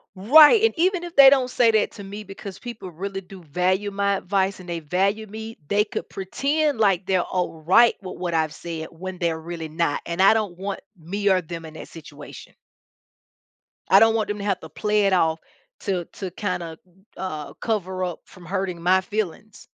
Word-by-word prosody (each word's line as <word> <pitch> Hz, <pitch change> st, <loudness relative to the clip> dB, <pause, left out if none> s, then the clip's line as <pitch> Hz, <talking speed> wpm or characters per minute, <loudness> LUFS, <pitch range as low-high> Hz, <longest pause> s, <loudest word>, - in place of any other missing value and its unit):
Right, 295 Hz, -, +7 dB
and 450 Hz, -, +3 dB
even 360 Hz, +1 st, +1 dB
if 345 Hz, -1 st, -9 dB
they 270 Hz, -1 st, +10 dB
don't 260 Hz, -2 st, +3 dB
say 240 Hz, -2 st, +3 dB
that 220 Hz, -1 st, +1 dB
to 200 Hz, -, -10 dB
me 200 Hz, +2 st, -7 dB
because 195 Hz, -1 st, -9 dB
people 235 Hz, -6 st, -8 dB
really 195 Hz, +3 st, -5 dB
do 185 Hz, 0 st, -13 dB
value 185 Hz, +6 st, 0 dB
my 200 Hz, 0 st, 0 dB
advice 190 Hz, 0 st, -1 dB
and 180 Hz, -, -12 dB
they 170 Hz, -1 st, -3 dB
value 195 Hz, +7 st, 0 dB
me, 220 Hz, +2 st, -8 dB
they 205 Hz, +1 st, +3 dB
could 210 Hz, -, -5 dB
pretend, 285 Hz, +10 st, -1 dB
like, 195 Hz, -4 st, +2 dB
they're 185 Hz, -2 st, +2 dB
alright 180 Hz, +5 st, +3 dB
with 185 Hz, -, -8 dB
what 175 Hz, -2 st, -3 dB
I've 160 Hz, -2 st, +1 dB
said 165 Hz, -2 st, -6 dB
when 185 Hz, +3 st, -7 dB
they're 165 Hz, -2 st, -1 dB
really 165 Hz, 0 st, -6 dB
not, 155 Hz, -1 st, -1 dB
and 170 Hz, +2 st, -4 dB
I 195 Hz, +3 st, +7 dB
don't 205 Hz, -6 st, -2 dB
want 195 Hz, +1 st, -4 dB, 0.2 s
me 200 Hz, +5 st, -1 dB
or 185 Hz, -, +4 dB
them 165 Hz, -1 st, -8 dB
in 160 Hz, -1 st, -10 dB
that -, -, -9 dB
situation. 165 Hz, -2 st, -12 dB, 1.4 s
I -, -, +8 dB
don't 225 Hz, 0 st, +5 dB
want 220 Hz, -2 st, 0 dB
them 205 Hz, 0 st, -3 dB
to 200 Hz, -, -5 dB
have 195 Hz, -3 st, 0 dB
to -, -, -10 dB
play 210 Hz, -1 st, 0 dB
it 195 Hz, -, +2 dB
off 165 Hz, -3 st, +2 dB, 0.4 s
to 185 Hz, -3 st, -2 dB
to 190 Hz, -2 st, -7 dB
kinda, 175 Hz, -4 st, -4 dB, 0.4 s
uh, 155 Hz, -6 st, -6 dB
cover 190 Hz, -4 st, -2 dB
up 180 Hz, -1 st, -5 dB
from 180 Hz, -2 st, -16 dB
hurting 185 Hz, -1 st, -3 dB
my 185 Hz, +2 st, +4 dB
feelings. 210 Hz, +1 st, -5 dB
190 Hz, 195 wpm, -23 LUFS, 175-210 Hz, 1.4 s, they